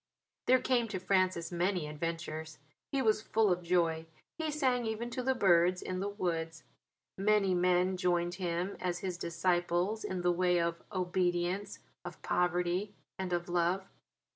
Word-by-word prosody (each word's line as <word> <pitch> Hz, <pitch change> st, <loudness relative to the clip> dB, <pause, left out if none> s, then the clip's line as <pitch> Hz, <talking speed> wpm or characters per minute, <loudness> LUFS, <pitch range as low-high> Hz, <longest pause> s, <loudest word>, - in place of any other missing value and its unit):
There 255 Hz, -, +7 dB
came 245 Hz, -2 st, +1 dB
to 200 Hz, -4 st, -4 dB
Francis 185 Hz, -2 st, +1 dB
many 175 Hz, -1 st, 0 dB
adventures. 160 Hz, 0 st, -4 dB, 0.3 s
He 275 Hz, -1 st, +1 dB
was 215 Hz, -2 st, +3 dB
full 220 Hz, -2 st, +2 dB
of 180 Hz, 0 st, +1 dB
joy; 165 Hz, -2 st, +1 dB, 0.3 s
he 315 Hz, -1 st, -1 dB
sang 260 Hz, -5 st, +1 dB
even 225 Hz, +2 st, -3 dB
to 255 Hz, -, -2 dB
the 260 Hz, +1 st, +1 dB
birds 180 Hz, -4 st, +4 dB
in 185 Hz, 0 st, -4 dB
the 200 Hz, +2 st, -1 dB
woods. 165 Hz, -5 st, -3 dB, 0.6 s
Many 200 Hz, -1 st, +3 dB
men 180 Hz, +1 st, +2 dB
joined 175 Hz, -1 st, +1 dB
him 175 Hz, +2 st, -1 dB
as 180 Hz, -1 st, -1 dB
his 185 Hz, -2 st, -2 dB
disciples 175 Hz, +4 st, 0 dB
in 185 Hz, -1 st, -3 dB
the 175 Hz, 0 st, +3 dB
way 180 Hz, 0 st, +2 dB
of 170 Hz, 0 st, -1 dB
obedience, 180 Hz, 0 st, -1 dB, 0.3 s
of -, -, -8 dB
poverty, 180 Hz, +3 st, 0 dB, 0.2 s
and 190 Hz, -1 st, -3 dB
of 175 Hz, 0 st, -1 dB
love. 175 Hz, +2 st, 0 dB
180 Hz, 155 wpm, -32 LUFS, 175-200 Hz, 0.6 s, There